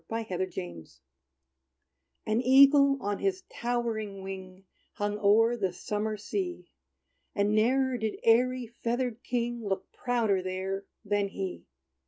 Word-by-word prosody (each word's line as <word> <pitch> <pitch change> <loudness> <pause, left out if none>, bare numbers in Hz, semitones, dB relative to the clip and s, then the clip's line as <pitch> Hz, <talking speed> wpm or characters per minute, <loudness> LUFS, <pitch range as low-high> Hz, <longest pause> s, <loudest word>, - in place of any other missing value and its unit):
=The 225 0 -2
Sea 190 - -7 0.2
Eagle's 85 -6 -7 1.3
Fall= 215 - 0
An 230 - +2
Eagle, 275 +2 +6
on 205 0 -2
his 380 -1 -1
towering 225 -5 -2
wing, 190 0 -8 0.3
Hung 205 0 -2
o'er 225 +4 +4
the 195 -6 -1
summer 210 +4 -3
sea; 355 - -4 0.6
And 205 +1 +2
ne'er 255 +3 +2
did 220 -1 -2
airy, 250 +2 +3
feathered 235 +1 -3
king 240 -1 -2
Look 195 -2 -3
prouder 225 -6 0
there 190 +1 -3 0.2
than 205 0 +1
he. 195 -2 -6
220 Hz, 130 wpm, -29 LUFS, 195-245 Hz, 1.3 s, Eagle